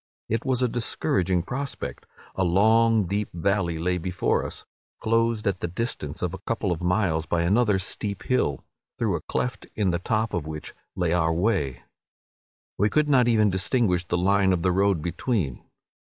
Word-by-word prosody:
It 115 +2 0
was 130 -1 +1
a - - +4
discouraging 95 -6 0
prospect; 140 +8 -5 0.3
a 95 - +1
long 110 +5 +4
deep 100 +3 -2
valley 85 -1 0
lay 90 +2 0
before 90 +1 0
us, - - -7 0.3
closed 115 0 +1
at 100 -2 0
the - - -2
distance 90 -6 -4
of 90 - -1
a - - -6
couple 110 -4 -2
of 85 -1 -2
miles 90 -3 +1
by 85 0 +1
another 105 +3 +3
steep 100 +1 -4
hill, 125 - 0 0.3
through - - 0
a - - -3
cleft 120 -5 -3
in 100 -4 +1
the 85 - -1
top 110 +4 -1
of 80 -4 -2
which 75 -1 -6 0.2
lay 85 -2 0
our 80 -2 +2
way. 80 - 0 1.0
We 105 +2 +3
could 150 +3 +2
not 130 -4 +5
even 110 -3 +4
distinguish 95 -1 +1
the 90 - 0
line 95 +1 +3
of 85 -2 -1
the 90 - +3
road 95 -3 +2
between. 85 - -2
95 Hz, 175 wpm, -25 LUFS, 85-115 Hz, 1.0 s, not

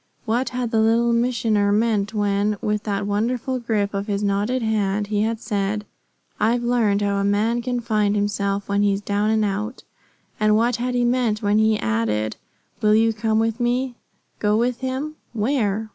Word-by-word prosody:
What 240 +3 0
had 250 -2 -3
the 225 - +2
Little 230 +2 +3
Missioner 225 -4 +1
meant 210 -1 +1
when, 205 -1 0
with 210 0 -1
that 200 -1 -1
wonderful 240 +5 -1
grip 215 -4 -1
of 200 +1 -3
his 205 -1 -1
knotted 205 +5 0
hand, 210 -2 0
he 205 0 -1
had 225 +1 -1
said, 210 -1 -2 0.5
"I've 235 +3 +2
learned 225 -4 +2
how 200 0 0
a 200 - 0
man 215 +4 +1
can 245 0 -2
find 210 -3 +1
himself 205 -1 -1
when 200 0 +1
he's 200 -1 +2
down 205 +1 0
and 220 -1 +2
out"? 210 +4 -3 0.6
And 215 0 +3
what 230 +1 +2
had 250 +1 -2
he 245 0 +2
meant 240 -3 +1
when 205 +1 +3
he 220 0 +3
added, 110 - -1 0.4
"Will 215 -1 +4
you 225 +1 +3
come 220 0 0
with 225 +1 0
me"? 245 +1 0 0.5
Go 210 0 +2
with 240 +1 0
him? 270 +4 -4 0.2
Where? 220 -2 0
215 Hz, 180 wpm, -22 LUFS, 205-235 Hz, 0.6 s, Will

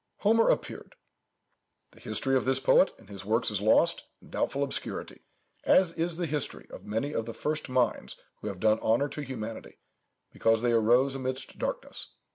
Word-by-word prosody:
"Homer 225 +2 +4
appeared. - - -2 1.0
The - - -19
history 135 -1 -1
of 130 - +2
this 130 0 +2
poet 185 - +4
and 110 - -19
his 100 -1 -9
works 110 +3 +1
is 100 -2 -2
lost 110 - +3
in - - -18
doubtful 140 +1 -1
obscurity, 140 - -5 0.4
as 185 -3 +4
is 165 0 -2
the 175 - -1
history 150 -3 -3
of - - -10
many 115 +8 -2
of 115 - -2
the 115 - -6
first 155 -1 -3
minds 125 -3 0 0.2
who - - -7
have 100 -3 -5
done 110 +2 +3
honour 120 +6 +2
to 150 - -6
humanity, 115 -5 -7 0.5
because 115 0 +2
they 120 -1 +2
rose 120 +4 +4
amidst 130 0 -5
darkness. - - -4
130 Hz, 175 wpm, -29 LUFS, 110-145 Hz, 1.0 s, Homer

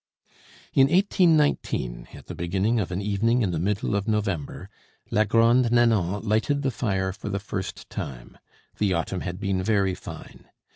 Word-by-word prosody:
In 135 0 +5
1819, 155 - +2
at - - -13
the - - -7
beginning 95 +7 0
of 95 -4 -2
an 90 +3 -3
evening 115 +4 +1
in 95 - 0
the 85 - -2
middle 100 +3 -1
of 100 +1 -1
November, 100 -9 -2 0.4
la 110 +1 +3
Grande 115 +3 +3
Nanon 110 -4 +2
lighted 125 +7 +1
the 135 - +1
fire 95 -6 -1
for 105 +1 -7
the 100 - -1
first 100 -1 -5
time. 60 -3 -7 0.4
The 100 -3 +2
autumn 85 +2 -2
had 90 0 -5
been 100 -3 -1
very 100 -1 +1
fine. - - -10
100 Hz, 160 wpm, -25 LUFS, 95-115 Hz, 0.4 s, In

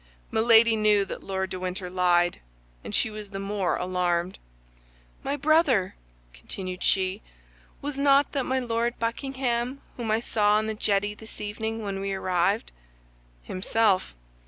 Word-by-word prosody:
Milady 225 0 +5
knew 210 -2 +3
that - - -7
Lord 190 -1 -3
de 185 - -4
Winter 185 +1 -4
lied, 175 -1 +2 0.4
and - - -4
she 220 - +1
was 210 -1 -8
the 195 - -6
more 195 -2 -1
alarmed. 180 0 -1 0.8
"My 275 - -2
brother," 290 - +3 0.4
continued 180 - -6
she, 190 +2 +1 0.6
"was 285 -1 -4
not 280 0 +4
that 275 -3 -1
my 260 - +1
Lord 235 -1 -1
Buckingham 250 +1 -2 0.2
whom 235 -3 -3
I 220 +1 +3
saw 210 -2 +2
on 215 - 0
the 220 - -2
jetty 205 -1 0
this 220 +1 -13
evening 220 +1 -4
as 195 -1 -3
we 195 0 -2
arrived?" 175 - 0 0.7
"Himself. 190 - +1
210 Hz, 145 wpm, -26 LUFS, 185-235 Hz, 0.8 s, Milady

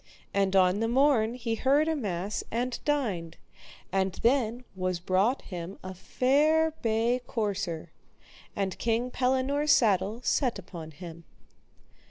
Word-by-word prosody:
And 195 -1 +1
on 185 +1 +4
the 225 - +1
morn 245 -2 +3
he 230 -2 -3
heard 275 +6 +2
a 320 - +1
mass 200 - -3
and 240 +2 -2
dined; 205 - -1 0.5
and 190 -1 0
then 240 -1 +2
was 185 -1 -2
brought 190 +8 +1
him 180 0 -7
a 185 0 -6
fair 300 - +2
bay 230 +2 +1
courser, 200 -7 -3 0.6
and 195 -2 -2
King 235 +2 0
Pellinore's 265 +4 +1
saddle 205 -1 +3
set 250 -4 +1
upon 175 -4 -9
him. 170 +1 -10
220 Hz, 130 wpm, -28 LUFS, 185-255 Hz, 0.6 s, on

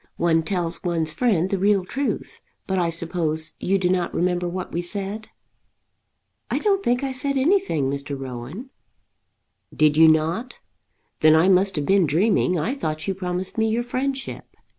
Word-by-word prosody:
One 165 -1 +2
tells 175 -1 -2
one's 165 -3 -1
friend 190 -5 +1
the 195 - 0
real 200 -1 +2
truth. 275 +8 -4 0.2
But 190 -1 -1
I 170 -1 +1
suppose 160 -2 0
you 195 +2 +1
do 185 -2 0
not 180 -1 0
remember 180 0 0
what 185 +1 -5
we 175 - -2
said?" 200 +4 -3 1.2
"I - - 0
don't 400 -2 +1
think 245 +2 +1
I 270 - -1
said 275 +2 -1
anything, 290 - +1
Mr. 140 +1 -4
Rowan." 135 - -7 1.0
"Did 155 -1 +2
you 160 0 +8
not? 160 +10 +1 0.6
Then 155 0 +6
I 165 +4 +4
must 195 +1 +4
have 150 -2 -2
been 190 -1 +3
dreaming. 180 +3 +2
I 215 - -1
thought 155 - -4
you 195 - 0
promised 185 +2 -4
me 220 0 +2
your 230 +2 0
friendship." 265 +2 -4
180 Hz, 165 wpm, -23 LUFS, 160-220 Hz, 1.2 s, you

